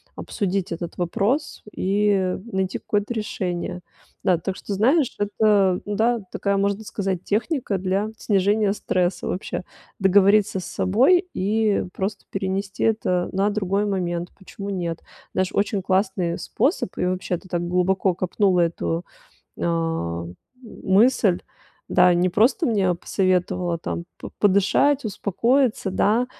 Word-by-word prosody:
обсудить 195 -4 -2
этот 170 0 -6
вопрос 205 - -1
и 195 -1 +1 0.2
найти 190 -1 -1
какое-то 205 +3 -2
решение. 180 -5 -3 0.4
Да, 180 -2 +3
так 190 +3 -4
что 200 - -5
знаешь, 260 - +2
это, 205 -2 +2
ну 205 0 -3
да, 230 +2 +2
такая, 200 +1 -1
можно 200 +2 0
сказать, 195 -4 -3
техника 225 - -1
для 190 +3 -1
снижения 205 0 +2
стресса 180 -3 -1
вообще. 185 0 -3 0.3
Договориться 195 0 +4
с - - -7
собой 265 - +3
и 210 +2 +1
просто 195 +1 -4
перенести 195 0 -3
это 185 -5 +1
на 195 +2 +1
другой 200 0 0
момент. 175 -3 -2
Почему 200 +1 -8
нет? 170 -4 -3 0.3
Знаешь, 185 0 0
очень 200 -1 0
классный 190 -2 0
способ. 295 - 0
И, - - 0
вообще-то, 180 -1 -2
ты - - -14
так 175 -1 -1
глубоко 180 +2 +1
копнула 185 +1 +1
эту, 170 0 -1 0.5
ам, 90 - -2 0.3
мысль. 215 -2 +2 0.5
Да, 180 - +5
не 175 +1 +2
просто 235 - +3
мне 195 - +2
посоветовала 180 -1 0
там 170 +1 -5
п - - -8
подышать, 205 +8 +3
успокоиться, 225 +2 +1
да, 220 +6 +2
195 Hz, 130 wpm, -23 LUFS, 180-210 Hz, 0.5 s, Да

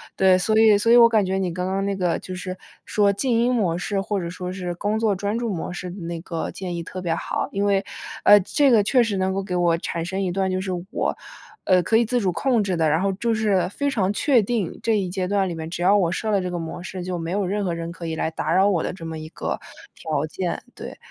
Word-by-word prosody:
对， 190 -1 +5
所 215 +4 +1
以 220 -2 +6
所 230 +3 +2
以 240 - +8
我 235 -1 +9
感 215 -3 +3
觉 190 +1 -1
你 185 -2 -1
刚 180 +1 -3
刚 195 +1 -1
那 200 - -1
个 180 -3 0
就 185 - -7
是， 185 0 -5 0.3
说 205 -1 +2
静 250 +6 -1
音 245 +2 +2
模 195 -9 +1
式， 195 +2 -2
或 200 +1 -2
者 170 -2 -4
说 180 +1 -5
是， 180 -2 -4
工 210 +4 -1
作 215 -3 +2
专 205 +4 -2
注 235 -2 -2
模 170 - -4
式 180 0 -6
的 190 - -9
那 170 0 -4
个 165 -2 -4
建 180 -2 -5
议 170 - -3
特 185 +2 -7
别 170 -2 -1
好。 - - -3
因 200 +1 -1
为， 200 -1 +2 0.4
呃， 205 0 +8
这 280 +9 +2
个 220 -4 +5
确 250 +5 +3
实 215 -4 -1
能 190 0 0
够 195 - -1
给 185 -2 -4
我 175 -2 +2
产 170 -1 -3
生 190 +3 -3
一 185 -2 -1
段 190 +1 0
就 185 - 0
是 190 - -3 0.2
我， - - -1 0.5
呃， 185 -1 +4
可 225 - +3
以 235 - +3
自 245 +2 0
主 190 -3 +1
控 240 +3 +1
制 190 -3 -1
的， 160 -1 +2
然 160 +3 +2
后 195 0 +1
就 230 +4 -1
是， 210 -4 +1
非 285 +8 -1
常 200 -7 0
确 250 +3 +3
定， 210 -4 -2
这 225 -2 +2
一 190 -3 -1
阶 185 0 -2
段 200 0 +1
里 - - -3
面 160 0 -6
只 175 - -5
要 195 +3 +5
我 175 -4 +2
设 215 +3 -2
了 200 -2 +2
这 180 - -3
个 175 - -3
模 165 +1 -6
式， 185 -1 -6
就 180 0 -3
没 165 0 -4
有 200 +1 0
任 205 +3 -1
何 175 - -1
人 165 0 -5
可 170 0 -8
以 160 - -3
来 160 - -1
打 160 0 -2
扰 190 +2 +4
我 175 -5 +1
的 - - -2
这 170 -3 -9
么 160 -1 -5
一 155 0 -8
个 - - -4 0.4
条 155 -2 -2
件。 175 +3 -3
对， - - -8
190 Hz, 305 characters per minute, -23 LUFS, 175-205 Hz, 0.5 s, 我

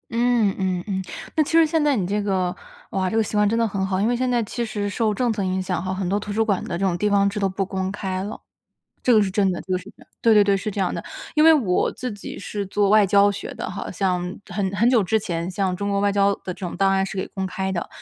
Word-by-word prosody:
嗯 235 -4 +2
嗯 185 -2 -1
嗯， 190 -2 -1 0.4
那 310 - +5
其 - - -6
实 330 0 +6
现 320 +1 +1
在 295 -2 +3
你 195 -6 0
这 205 +3 -1
个， 190 -3 0 0.4
哇， 185 -1 -1
这 220 - -3
个 225 - +3
习 210 - -3
惯 210 0 +4
真 225 +3 +1
的 230 - +2
很 195 -3 -1
好。 190 -1 -1
因 - - +2
为 245 - +1
现 255 +1 0
在 240 -2 +1
其 235 +3 -3
实 205 -2 -3
受 215 +1 0
政 240 +3 0
策 215 -2 -2
影 185 0 -1
响 185 -1 -2
哈， 185 +1 -3
很 190 -1 -2
多 200 +2 +1
图 210 0 -5
书 225 +2 +1
馆 200 -4 +1
的 170 - -3
这 195 - 0
种 175 -2 +1
地 210 +4 +1
方 200 -1 +3
制 200 - -4
都 195 - +2
不 190 +1 -2
公 190 0 -3
开 190 -2 -3
了。 205 +3 -6 0.6
这 250 - +4
个 215 - +6
是 200 - +1
真 195 0 +2
的 180 - -4
这 190 - -8
个 185 - +2
是 180 - -9
真 - - -13
的， - - -19
对 230 - +5
对 210 -1 +6
对， 200 -1 +2
是 210 +3 -4
这 200 - -2
样 185 - +1
的。 - - -5 0.3
因 305 - +5
为 325 0 +8
我 215 -12 +1
自 250 -1 -5
己 205 -1 -8
是 200 0 -4
做 200 +1 +1
外 210 0 +6
交 200 +1 +4
学 200 - -6
的 - - -5
哈， 185 - -5
像 185 -1 0 0.3
很 195 +1 -2
很 230 +5 +3
久 240 -5 +4
之 220 +4 +1
前 170 -4 -3
像 185 -1 -1
中 200 +2 -3
国 200 - +1
外 200 0 +2
交 200 0 +3
的 - - -33
这 180 - -2
种 175 - -5
档 195 0 +3
案 195 0 +2
是 195 - -7
给 190 - -2
公 190 -1 -4
开 190 +1 -3
的， 175 -3 -3
200 Hz, 325 characters per minute, -23 LUFS, 190-215 Hz, 0.6 s, 为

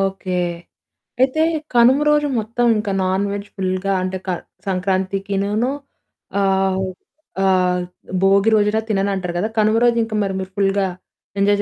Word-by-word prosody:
Okay. 195 -1 -2 0.9
అయితే 265 +4 +2 0.3
కనుమ 245 +3 +5
రోజు 295 0 +3
మొత్తం 230 +3 -1
ఇంకా 210 -1 -2
నాన్ 190 +2 +1
వెజ్ 205 0 -5
ఫుల్‌గా 185 0 -1
అంటే 185 0 -2
క - - -2 0.4
సంక్రాంతికినూనూ 195 +4 -1 0.7
ఆహ్, 190 -1 +1 0.6
ఆహ్, 180 -1 +2 0.4
భోగి 195 +2 +4
రోజున 210 0 +2
తినన్నంటారు 195 -3 -1
కదా! 210 +5 -1
కనుమ 215 +1 +3
రోజు 235 -1 +3
ఇంకా 225 -1 -4
మరి 195 - -2
మీరు 190 0 -6
ఫుల్‌గా 195 0 +2 0.5
ఎంజాయ్ 205 +1 +3
195 Hz, 130 wpm, -20 LUFS, 190-215 Hz, 0.9 s, కనుమ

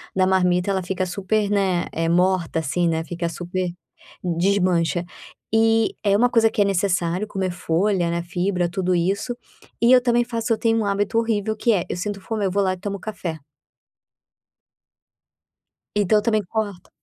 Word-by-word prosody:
da 190 -1 +3
marmita, 180 0 +2
ela 190 -1 0
fica 185 +1 -2
super, 200 +3 -1
né, 190 -4 +1
eh, 165 0 -1
morta, 180 -1 +2
assim, 170 +3 0
né, 160 0 0
fica 170 +1 -4
super 175 +2 -3 0.5
desmancha. 175 -2 +1 0.5
E 225 0 +3
é 200 -2 +3
uma 245 +4 +4
coisa 225 -2 +4
que 210 - -1
é - - +4
necessário 185 0 0
comer 190 -3 -2
folha, 175 +1 0
né, 170 0 -1
fibra, 180 0 -1
tudo 185 -1 0
isso. 200 +8 -1 0.5
E 235 +2 +5
eu 255 - +7
também 240 -1 +2
faço 230 -1 -1
eu 220 - -1
tenho 225 -1 +1
um 215 - -1
hábito 205 +3 0
horrível 220 -2 0
que 230 +1 +2
é: 185 - +1
eu - - -3
sinto 200 +1 -4
fome, 210 0 -2
eu 190 - 0
vou 200 +2 +1
lá 185 -1 +1
e - - -7
tomo 200 +1 -5
café. 175 -6 -5 2.6
Então 210 +1 +3
eu - - -3
também 215 -2 +1
corto 205 -2 -4
190 Hz, 175 wpm, -22 LUFS, 175-210 Hz, 2.6 s, eu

